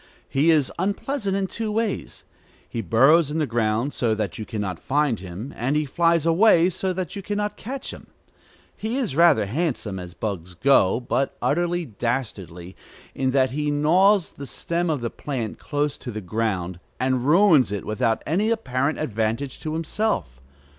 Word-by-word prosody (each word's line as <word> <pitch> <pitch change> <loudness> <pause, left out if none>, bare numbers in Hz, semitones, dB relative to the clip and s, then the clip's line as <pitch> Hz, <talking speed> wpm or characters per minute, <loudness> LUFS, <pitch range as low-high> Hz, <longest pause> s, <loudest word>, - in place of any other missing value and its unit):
He 145 +5 +2
is 150 -5 +3
unpleasant 200 +2 -1
in 195 - 0
two 215 +3 -4
ways. 220 -1 -2 0.4
He 115 - -4
burrows 135 - +4
in 150 - -3
the 155 - +1
ground 115 +2 0
so 115 -3 +1
that 105 -1 -3
you 110 - -5
can 110 - -4
not 95 -4 -3
find 140 -4 +1
him, 95 +8 -7
and 130 +5 -1
he 150 0 +1
flies 165 +2 +2
away 175 0 +5
so 190 +2 -1
that 180 -3 -4
you 200 - -4
can 205 +2 -3
not 210 0 -2
catch 265 +4 -6
him. - - -12 0.7
He 225 +4 -3
is 240 - -1
rather 165 -10 +5
handsome, 120 - -2
as 90 -1 -9
bugs 90 -4 -5
go, 120 -1 +4
but 130 +2 -1
utterly 175 +2 0
dastardly, 100 - -4 0.4
in 130 -1 0
that 130 -1 +2
he 150 +2 -1
gnaws 175 +6 +3
the 140 - -9
stem 170 +4 -2
of 150 -5 -1
the 115 - -3
plant 125 -7 -4
close 145 -1 -2
to 125 - -7
the 110 -2 -4
ground, 95 -3 -2 0.2
and 130 0 +1
ruins 155 - +5
it 100 - -4
without 110 +1 0
any 195 +8 +1
apparent 145 - 0
advantage 115 0 -2
to 155 - -4
himself. 160 - -2
140 Hz, 175 wpm, -24 LUFS, 110-170 Hz, 0.7 s, away